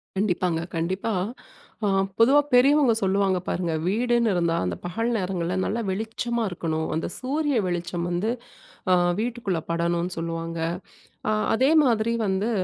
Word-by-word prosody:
கண்டிப்பாங்க. 180 -4 0 0.2
கண்டிப்பா. 190 +7 -1 0.7
அ - - +2 0.3
பொதுவா 265 +6 +6
பெரியவங்க 275 0 +5
சொல்லுவாங்க 195 -1 +2
பாருங்க, 175 -2 -1 0.2
வீடுன்னு 235 +2 +2
இருந்தா 170 -2 +1
அந்த 90 -1 -2
பகல் 225 +7 -1
நேரங்கள்ல 180 -2 -2
நல்ல 230 - -1
வெளிச்சமா 225 +4 -2
இருக்கணும். 160 -2 -2
அந்த 160 - -1
சூரிய 285 +1 0
வெளிச்சம் 175 0 -2
வந்து 175 +5 -1 0.6
ஆ - - +7 0.3
வீட்டுக்குள்ள 225 -6 -1
படணும்னு 170 +1 0
சொல்லுவாங்க. 165 0 -4 0.7
ஆ. - - +3 0.2
அதே 260 +5 +3
மாதிரி 230 -3 +2
வந்து 195 +3 0
190 Hz, 130 wpm, -25 LUFS, 170-230 Hz, 0.7 s, ஆ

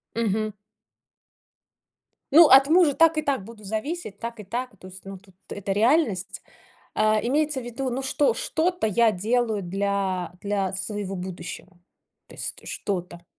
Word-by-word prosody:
Мгм. 215 -1 0 1.8
Ну, 330 +1 +9
от 270 +1 +8
мужа 325 -3 +5
так 325 +1 +4
и - - +2
так 275 -8 -1
буду 220 0 -13
зависеть, 220 - -4
так 235 0 -6
и 210 - -7
так. 245 +4 -4
То 185 - -12
есть, 190 +1 -13
ну, 195 0 -7
тут- 190 -1 -22
это 200 -1 -4
реальность. 220 - +1 0.5
А, 215 0 +3
имеется 295 +2 0
в - - -9
виду, 255 +2 -4
ну, 255 +3 -3
что 265 -2 +1
что-то 345 -3 -1
я 225 +2 +3
делаю 220 +1 0
для 190 -1 -2
для 200 -2 -1
своего 195 0 -4
будущего. 180 0 -8 0.5
Тс - - -5
т - - -18
что-то. 175 -3 -4
215 Hz, 150 wpm, -25 LUFS, 195-265 Hz, 1.8 s, Ну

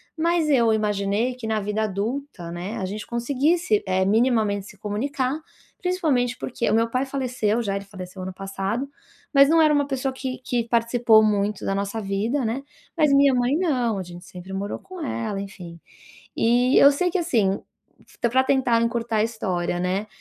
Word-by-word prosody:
mas 330 -1 +1
eu 235 -5 +4
imaginei 210 +2 0
que 245 -3 -7
na 220 -1 0
vida 210 +2 -1
adulta, 210 -2 -4
né, 180 +7 -5
a 190 - -2
gente 205 +3 -5
conseguisse, 260 - +1
eh, 190 0 +2
minimamente 215 -2 +2
se 205 - -14
comunicar, 260 +7 -2 0.4
principalmente 295 -10 0
porque 235 -3 -2
o 210 - +1
meu 230 +1 +3
pai 255 +3 0
faleceu 250 -5 -1
já, 195 -2 -2
ele 200 0 -4
faleceu 185 -2 -9
ano 185 0 -5
passado, 195 +6 -3 0.5
mas 275 0 +7
não 330 0 +5
era 305 -1 +5
uma 285 -1 +2
pessoa 270 -1 -2
que 260 -1 -5
que 240 -2 0
participou 230 -1 +4
muito 205 -1 0
da 195 - 0
nossa 200 +3 -2
vida, 215 +7 -1
né, 250 +5 -2 0.3
mas 305 -3 +3
minha 280 -1 +5
mãe 250 +3 +2
não, 255 - 0
a 190 - -3
gente 175 0 -11
sempre 180 +1 -10
morou 200 +1 -3
com 370 -3 -9
ela, 220 -7 -3
enfim, 180 -4 -9 0.6
e 245 +3 +3
eu 280 - +8
sei 360 +6 0
que 375 - 0
assim, 210 - +1 0.6
pra 255 +3 +3
tentar 255 -4 +2
encurtar 230 -1 -1
a 215 - +3
história, 185 -6 -2
né, 190 +4 -1
230 Hz, 180 wpm, -24 LUFS, 200-265 Hz, 0.6 s, eu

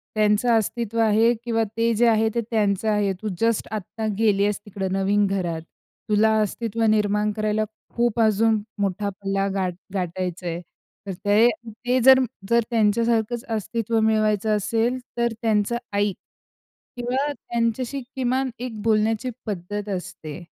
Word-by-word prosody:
"त्यांचं 215 +2 +3
अस्तित्व 230 +1 -2
आहे, 225 +1 +4
किंवा 225 -1 +1
ते 230 0 +2
जे 235 +2 +4
आहे, 220 -1 +3
ते 235 - +2
त्यांचं 210 -2 +1
आहे, 210 -2 +2
तू 220 - -4
जस्ट 230 -1 +1
आता 215 +1 -4
गेली 205 -3 +3
आहेस 205 0 0
तिकडं 195 -2 -4
नवीन 200 +2 +2
घरात. 175 -4 -2 0.5
तुला 215 +1 +4
अस्तित्व 225 +2 -2
निर्माण 210 0 +2
करायला 215 0 0 0.3
खूप 235 -1 +1
अजून 220 0 +3 0.2
मोठा 200 +1 -1
पल्ला 195 0 -2
गाठ 185 -2 -1 0.2
गाठायच 180 -1 -3
आहे, 170 -1 -3 0.5
तर 195 - -3
ते-ते 230 +3 +2
जर-जर 245 -4 +4
त्यांच्यासारखंच 230 +1 +1
अस्तित्व 225 +1 -1
मिळवायचं 215 -1 +2
असेल, 225 +4 0 0.2
तर 235 -1 +1
त्यांचं 220 0 +1 0.2
ऐक 205 -1 +1 0.8
किंवा 260 +4 -1
त्यांच्याशी 240 +2 -2
किमान 260 0 0
एक 235 -4 -5
बोलण्याची 220 +2 +1 0.2
पद्धत 205 0 -4
असते. 175 -4 -6
215 Hz, 135 wpm, -23 LUFS, 205-230 Hz, 0.8 s, आहे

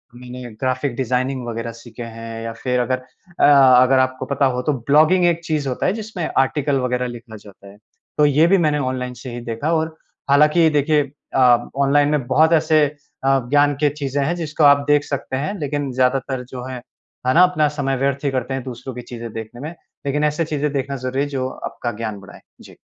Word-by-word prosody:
मैंने 125 0 -9 0.2
graphic 130 0 -1
designing 130 0 -1
वग़ैरह 115 0 -4
सीखे 115 0 -10
हैं 115 0 -8
या 115 0 -5
फिर 125 +2 -2
अगर 125 +1 0 0.4
अ, - - +5
अगर 130 -2 +6
आपको 130 0 0
पता 140 +1 0
हो 125 - -2
तो 150 +3 0
ब्लॉगिंग 155 +8 +3
एक 170 -1 +1
चीज़ 155 -4 -1
होता 125 - -2
है 185 - +2
जिसमें 210 -6 -5
आर्टिकल 140 +1 +1
वग़ैरह 125 0 -1
लिखा 115 -2 -9
जाता 100 -1 -16
है। 100 +1 -14 0.4
तो 150 - +5
ये 150 +3 +4
भी 195 +3 +4
मैंने 150 -4 +1
ऑनलाइन 130 -1 -3
से 125 +1 -9
ही 120 - -6
देखा 140 +9 -2
और 160 0 -1 0.3
हालाँकि 150 +3 +5
देखिए 150 0 +2 0.3
अ, 120 -2 +4 0.2
ऑनलाइन 145 +1 +3
में 145 -5 -1
बहुत 155 +5 +4
ऐसे 155 -1 +4 0.4
अ, 135 0 +4
ज्ञान 145 0 +4
के 145 - +4
चीज़ें 140 -1 -2
हैं, 170 +4 0
जिसको 160 -2 -2
आप 145 0 +6
देख 145 0 +4
सकते 135 -2 -4
हैं। 150 +9 -2
लेकिन 145 -1 -2
ज़्यादातर 130 0 0
जो 125 -1 -6
है, 130 - -6 0.5
है 130 - +3
ना, 175 +3 +7
अपना 155 -5 +3
समय 135 -1 0
व्यर्थ 140 +2 -1
ही 140 - +1
करते 130 0 -2
हैं 135 -1 -3
दूसरों 130 +1 -7
की 125 - -6
चीज़ें 115 -2 -8
देखने 115 +2 -8
में। 160 +4 -6 0.3
लेकिन 145 +2 0
ऐसे 150 +2 0
चीज़ें 150 -1 -2
देखना 140 0 -2
ज़रूरी 130 +2 -2
है 145 - 0
जो 130 -2 -2
आपका 120 - -5
ज्ञान 110 -3 -4
बढ़ाएँ। 95 - -14 0.2
जी। - - -15
135 Hz, 210 wpm, -20 LUFS, 125-150 Hz, 0.5 s, ना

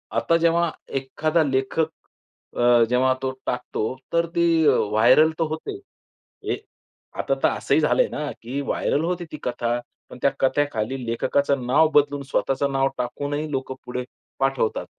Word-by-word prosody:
आता 165 - +2
जेव्हा 170 0 +2 0.3
एखादा 155 +5 0
लेखक 135 +3 0 0.7
अ, 120 -1 +5
जेव्हा 130 +1 +3
तो 130 0 -1
टाकतो, 125 -1 -2 0.2
तर 170 0 +3
ती 170 - +3 0.2
व्हायरअल 110 +10 +4
तर 165 - +3
होते. 390 - -5 0.7
ए - - -3 0.6
आता - - 0
तर - - +6
असंही - - +1
झालंय - - +3
ना, 150 -1 -4
की 125 +5 -4
व्हायरअल 145 +2 0
होते 175 0 -2
ती 150 - -6
कथा. 120 -1 -1 0.3
पण - - -10
त्या - - +4
कथेखाली 130 -3 0
लेखकाचं 130 +3 0
नाव 150 +5 +5
बदलून 145 -1 +3
स्वतःच 135 -1 -1
नाव 135 0 +2
टाकूनही 145 +5 -3
लोक 130 -1 -3
पुढे 125 0 -4 0.4
पाठवतात. 135 -4 0
135 Hz, 145 wpm, -23 LUFS, 125-155 Hz, 0.7 s, तर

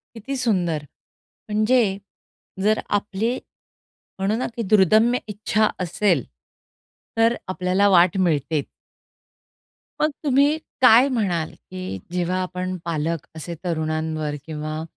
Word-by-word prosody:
किती 270 +5 -5
सुंदर. 180 - 0 0.7
म्हणजे 215 +4 +3 0.8
जर 215 +1 +3 0.2
आपली 205 +4 -1 0.8
म्हणू 195 +3 0
ना, 255 - -1
की 235 - -1
दुर्दम्य 215 +4 +5
इच्छा 215 +1 +1
असेल 180 - +1 0.9
तर 230 +1 +3
आपल्याला 185 +2 +2
वाट 180 -1 +5
मिळते. 155 -4 +1 1.4
मग 305 - +3
तुम्ही 280 +2 +4 0.2
काय 250 +1 +7
म्हणाल, 190 - -1 0.2
की 185 - -5
जेव्हा 180 +1 0
आपण 185 0 -3
पालक 165 -1 -2
असे 170 +2 -6
तरुणांवर 155 -2 -2
किंवा 155 0 -4
185 Hz, 105 wpm, -23 LUFS, 165-220 Hz, 1.4 s, काय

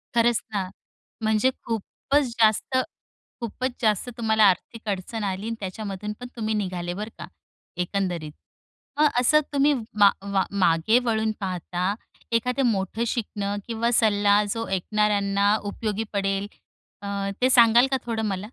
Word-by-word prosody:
खरंच 235 -1 +3
ना, 190 -2 -1 0.5
म्हणजे 220 +3 +3 0.2
खूपच 255 +6 -1
जास्त 220 +4 +3 0.6
खूपच 255 +3 -3
जास्त 215 +1 +1
तुम्हाला 220 -1 +3
आर्थिक 215 +3 +1
अडचण 205 +2 -3
आली 195 +2 -3
आणि 230 - -2
त्याच्यामधून 200 +1 -5
पण 245 - -6
तुम्ही 220 -1 -1
निघाले 180 -4 -3
बरं 210 +4 -5
का, - - -7 0.5
एकंदरीत. 180 -4 -2 0.7
मग 305 - +6
असं 305 +5 +5
तुम्ही 285 +1 +4 0.3
मा 200 -1 +8
मा 200 -1 +1 0.2
मागे 175 +7 +4
वळून 220 -1 +1
पाहता 185 0 -2 0.4
एखादं 250 +4 +1
मोठं 210 0 0
शिकणं 205 -3 -2
किंवा 235 +1 0
सल्ला 205 -2 +4
जो 225 0 -3
ऐकणाऱ्यांना 200 +1 +2
उपयोगी 210 +1 -3
पडेल 195 0 0 0.6
अ, 200 - -5 0.3
ते 255 - +4
सांगाल 240 +1 +6
का 265 - +3
थोडं 225 -2 -2
मला? 195 -3 -1
210 Hz, 135 wpm, -25 LUFS, 195-230 Hz, 0.7 s, मा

